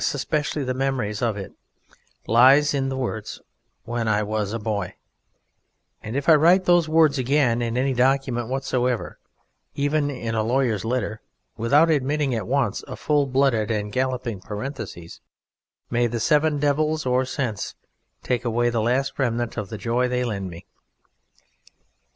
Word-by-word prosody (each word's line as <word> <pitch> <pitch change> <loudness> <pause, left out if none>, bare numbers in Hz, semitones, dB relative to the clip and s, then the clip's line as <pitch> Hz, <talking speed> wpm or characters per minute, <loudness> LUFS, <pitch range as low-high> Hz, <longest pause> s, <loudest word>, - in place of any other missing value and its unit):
especially 145 +1 -1
the 130 -1 -2
memory 130 -5 -1
of 115 -4 0
It, 95 - -7 0.7
lies 135 +6 +5
in 135 -1 0
the 135 - -3
words 110 -5 -4 0.4
"When 120 -1 -3
I 105 -1 +2
was 105 -1 -2
a 115 - -2
boy," 105 -4 -3 1.1
and 110 +4 -6
if 140 0 -2
I 165 - +8
write 175 +5 +5
those 175 -3 +4
words 155 -3 +4
again 130 -2 +2
in 115 0 -2
any 135 +1 +1
document 125 -2 +1
whatsoever, 130 -2 -2 0.6
even 145 +1 0
in 115 -5 -4
a 110 - +1
lawyer's 115 -3 0
letter, 115 -2 -2 0.3
without 145 +9 +3
admitting 145 -1 0
at 110 -4 -3
once 130 -4 0
a - - -6
full 145 -2 +1
blooded 130 -5 +1
and 105 -2 -2
galloping 125 -4 -2
parenthesis, 105 - -7 0.7
may 120 0 +2
the 115 0 -3
Seven 150 +6 +2
Devils 150 +2 0
of 130 0 +1
Sense 125 -6 -3 0.5
take 125 -1 -1
away 120 0 +1
the 115 -2 0
last 130 +6 0
remnant 120 -3 -1
of 105 -4 -4
the 110 - -6
joy 120 +3 0
they 125 0 -1
lend 100 -6 -3
me. 85 -1 -11
125 Hz, 155 wpm, -23 LUFS, 115-140 Hz, 1.1 s, I